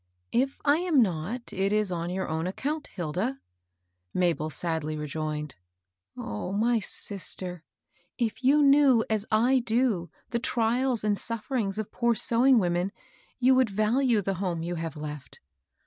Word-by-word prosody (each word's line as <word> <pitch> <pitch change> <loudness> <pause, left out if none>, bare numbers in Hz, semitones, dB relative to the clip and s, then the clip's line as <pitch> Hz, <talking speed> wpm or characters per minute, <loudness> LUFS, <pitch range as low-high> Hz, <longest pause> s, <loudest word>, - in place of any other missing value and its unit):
"If 265 +3 0
I 290 +1 +5
am 340 -4 +2
not, 195 +6 -4
it 195 +1 0
is 210 -2 +1
on 170 -1 -2
your 190 +1 -2
own 160 +2 -2
account, 290 +11 -3
Hilda," 190 - -3 0.8
Mabel 170 -4 +1
sadly 155 0 -3
rejoined. 150 -1 -4 0.4
" 90 +1 -62
Oh, 105 - -4
my 230 +3 +2
sis 195 -3 -4
ter 180 -1 -5
I - - -56 0.2
if 235 +1 -2
you 290 +3 +5
knew 275 -4 +5
as 215 -1 0
I 245 +5 +4
do 225 -7 0 0.2
the 235 - 0
trials 240 +1 +1
and 210 -1 +2
suf 230 -2 -4
ferings 215 -7 -1
of 215 -2 -4
poor 235 -1 +1
sewing 245 +4 +4
women, 180 -1 +1 0.5
you 260 +1 +4
would 255 -3 +3
value 215 +2 +2
the 195 - -1
home 175 -4 -2
you 175 +1 -3
have 165 -2 -4
left. 150 -2 -7
210 Hz, 165 wpm, -27 LUFS, 170-245 Hz, 0.8 s, I